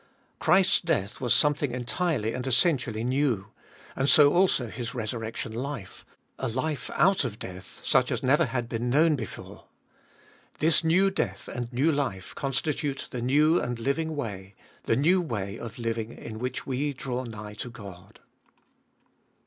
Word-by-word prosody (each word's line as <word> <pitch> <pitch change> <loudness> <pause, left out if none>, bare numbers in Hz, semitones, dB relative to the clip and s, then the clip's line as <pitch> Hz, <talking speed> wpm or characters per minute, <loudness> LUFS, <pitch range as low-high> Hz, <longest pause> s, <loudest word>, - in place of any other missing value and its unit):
Christ's 190 0 +4
death 120 - -1
was 125 -3 -1
something 145 -3 +3
entirely 125 -1 -1
and 125 +1 -4
essen 155 +6 +4
tially 115 -1 -4
new, 125 -6 0 0.4
and 135 +2 +1
so 145 +1 +7
also 175 -9 +3
His 115 +1 -6
resurrection 115 -1 -4
life; 125 -3 -6 0.3
a 130 - -1
life 130 +6 -2
out 185 +2 +4
of 110 -5 -4
death, 90 -1 -9
such - - +3
as - - -2
never 145 +6 +4
had 120 -1 -2
been 120 +1 -2
known 155 +4 +4
before. 110 -8 -8 0.9
This 160 +2 +3
new 185 +4 +4
death 190 - -2
and 120 -1 -5
new 135 +6 +2
life 130 - -2
constitute 140 +1 -2
the 125 - -4
new 150 +7 +4
and 120 -1 -3
living 145 +6 -1
way, 100 -8 -5 0.3
the - - +2
new 175 +7 +4
way 105 - -4
of 115 -1 -7
living 115 -1 -2
in 110 -2 -8
which 125 +1 -3
we 140 +2 -1
draw 130 -1 -4
nigh 105 -3 -8
to 105 +4 -6
God. 100 -5 -12
125 Hz, 155 wpm, -27 LUFS, 115-150 Hz, 0.9 s, so